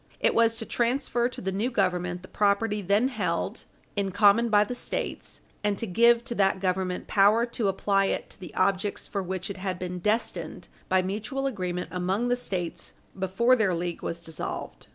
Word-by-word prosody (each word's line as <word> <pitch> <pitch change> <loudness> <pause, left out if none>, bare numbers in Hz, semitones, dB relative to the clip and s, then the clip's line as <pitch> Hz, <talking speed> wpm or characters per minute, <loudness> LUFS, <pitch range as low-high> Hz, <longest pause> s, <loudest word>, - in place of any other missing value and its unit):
It - - +3
was 230 0 +4
to 225 - -4
transfer 240 0 0
to - - -7
the 190 - -2
new 205 +6 0
Government 180 -5 0
the - - -10
property 210 +1 +1
then 200 +7 +2
held 200 -3 -2 0.3
in 200 -1 0
common 205 +4 +5
by 210 -1 +5
the 210 - -4
States, 245 - -3 0.2
and 205 -1 +1
to 230 - -2
give 235 +4 +4
to 235 - -4
that 195 -3 +2
Government 185 -1 -1
power 210 +4 +4
to 235 -3 -2
apply 195 +1 +2
it - - -2
to - - -13
the 180 - -10
objects 195 +1 0
for 200 - -2
which 185 +1 -4
it 200 - -7
had 185 -1 -3
been 180 0 -4
destined 215 +5 -1 0.2
by 185 0 +3
mutual 220 +8 -3
agreement 180 -8 -2
among 190 +6 0
the 245 - +3
States 175 -8 -5 0.3
before 195 +7 +3
their 200 -7 +2
league 175 0 -3
was 165 - -4
dissolved. 160 -2 -6
200 Hz, 190 wpm, -27 LUFS, 185-230 Hz, 0.3 s, common